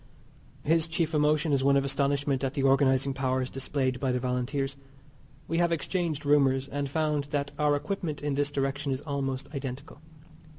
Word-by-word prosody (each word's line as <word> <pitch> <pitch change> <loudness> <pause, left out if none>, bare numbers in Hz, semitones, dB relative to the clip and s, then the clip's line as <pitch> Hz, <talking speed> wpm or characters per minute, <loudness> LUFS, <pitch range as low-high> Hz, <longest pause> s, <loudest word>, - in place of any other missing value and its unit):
His 165 +1 +2
chief 165 -1 -1
emotion 150 0 +2
is 135 -1 +2
one 140 0 +5
of 140 - +1
astonishment 140 0 0
at 135 0 -1
the 140 - 0
organizing 135 0 +3
powers 130 -1 -1
displayed 130 -1 -1
by 130 0 0
the 125 - 0
Volunteers. 130 +2 -1 0.7
We 165 +1 0
have 170 -1 +3
exchanged 165 -2 -1
rumours, 135 -2 +3
and 140 0 -3
found 150 -1 0
that 145 -1 -2
our 150 -1 +3
equipment 160 -1 -3
in 145 -1 0
this 145 +1 0
direction 140 0 -1
is 130 +1 -2
almost 135 -3 -3
identical. 140 +2 -6
140 Hz, 170 wpm, -28 LUFS, 135-150 Hz, 0.7 s, one